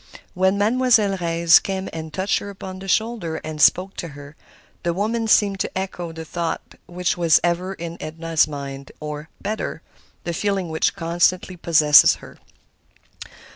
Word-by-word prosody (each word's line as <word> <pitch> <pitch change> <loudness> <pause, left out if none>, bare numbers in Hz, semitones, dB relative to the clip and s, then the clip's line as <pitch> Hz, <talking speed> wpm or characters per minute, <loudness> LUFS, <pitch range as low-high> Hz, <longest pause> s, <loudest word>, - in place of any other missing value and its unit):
When 190 +2 +2
Mademoiselle 220 -2 +3
Reisz 170 -1 +5
came 190 -1 -4
and 160 -1 -6
touched 190 +4 0
her 200 - -8
upon 190 -1 -8
the 195 - -9
shoulder 220 -5 0
and 155 -1 -5
spoke 185 +5 +4
to 170 - -4
her, 145 +1 -12 0.5
the 170 -1 -1
woman 225 +3 -1
seemed 200 -2 +3
to - - -3
echo 180 -3 -4
the 160 0 -8
thought 170 0 -4
which 180 0 -2
was 170 -2 +4
ever 180 +2 -1
in 170 -1 -7
Edna's 160 0 0
mind; 140 -2 -7
or, 150 +1 -6
better, 215 +2 -4 0.4
the 170 - -3
feeling 195 -1 -1
which 160 0 0
constantly 175 +1 0
possessed 155 -3 +6
her. - - -14
175 Hz, 155 wpm, -22 LUFS, 160-195 Hz, 0.5 s, possessed